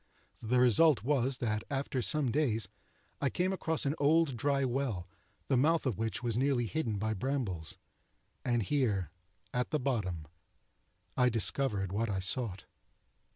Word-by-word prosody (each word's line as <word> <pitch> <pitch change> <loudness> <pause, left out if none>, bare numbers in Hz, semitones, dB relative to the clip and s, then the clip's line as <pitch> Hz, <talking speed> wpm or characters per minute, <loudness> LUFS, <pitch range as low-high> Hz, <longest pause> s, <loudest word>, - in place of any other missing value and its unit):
The 125 +3 +1
result 125 +2 +5
was 135 -1 +1
that, 110 -3 -2
after 135 -2 -2
some 145 -1 +2
days, 115 -5 +1 0.5
I 140 - +2
came 185 +5 0
across 160 -4 -1
an 140 - +1
old 150 -1 +3
dry 140 +2 +1
well, 120 -8 -2 0.4
the 135 - +2
mouth 160 +5 +2
of 120 -6 -1
which 115 +1 -2
was 115 -2 0
nearly 130 -1 +1
hidden 115 -4 -2
by 110 +2 -1
brambles; 105 - -3 0.7
and 120 -2 +1
here, 100 - 0 0.4
at 125 0 -1
the 150 - 0
bottom, 100 - -2 0.9
I 125 -1 +4
discovered 105 -3 +2
what 110 +3 -1
I 95 -2 -1
sought. 95 0 0
125 Hz, 150 wpm, -32 LUFS, 110-140 Hz, 0.9 s, result